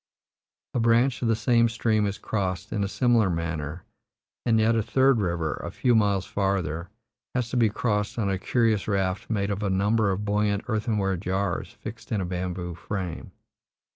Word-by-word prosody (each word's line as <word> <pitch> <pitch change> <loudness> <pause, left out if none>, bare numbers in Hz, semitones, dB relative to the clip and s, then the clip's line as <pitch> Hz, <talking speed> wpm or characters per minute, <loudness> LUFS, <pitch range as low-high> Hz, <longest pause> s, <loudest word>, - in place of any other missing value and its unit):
A - - 0
branch 120 +3 +3
of 120 - +1
the 115 - +3
same 115 +1 +3
stream 110 -2 +1
is 100 - -3
crossed 95 -1 -3
in 105 -2 0
a - - 0
similar 115 -1 +3
manner, 80 -1 -3 0.6
and 115 -1 +4
yet 110 +1 +3
a 115 - +2
third 130 +1 +3
river, 85 -4 -1
a - - -3
few 125 - +1
miles 100 -4 +2
farther, 90 -4 -1 0.5
has 125 -2 0
to - - -3
be 115 -3 +4
crossed 105 -1 -1
on 110 -4 0
a 95 -1 0
curious 115 -1 +1
raft 95 -2 -1
made 105 -2 0
of 100 +1 -2
a 100 - 0
number 100 +3 +2
of 95 +2 -1
buoyant 105 0 +1
earthenware 105 -4 0
jars 95 0 -2
fixed 115 +1 -8
in 110 - +1
a 95 - -1
bamboo 90 0 -3
frame. 90 +1 -5
105 Hz, 180 wpm, -26 LUFS, 95-115 Hz, 0.6 s, and